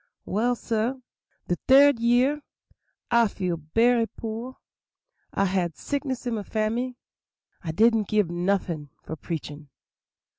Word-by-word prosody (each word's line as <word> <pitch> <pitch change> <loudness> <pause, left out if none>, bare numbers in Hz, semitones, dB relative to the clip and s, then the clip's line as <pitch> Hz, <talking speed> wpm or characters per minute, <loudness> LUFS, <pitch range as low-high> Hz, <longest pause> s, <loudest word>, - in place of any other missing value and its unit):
"Well, 240 +5 +1
sah, 230 +2 -1 0.5
de 175 - +1
third 275 -1 +7
year 250 +5 +3 0.7
I 235 -1 +5
feel 185 -4 -3
berry 225 +9 +2
poor; 230 +4 -6 0.7
had 185 -4 0
sickness 275 -3 -3
in 240 - -1
my 215 - -2
family; 230 +4 -2 0.7
I 165 - -3
didn't 220 +3 +3
gib 210 -5 +1
noffin' 175 -4 -1
for 160 - -6
preachin'. 150 -2 -6
220 Hz, 115 wpm, -26 LUFS, 175-245 Hz, 0.7 s, third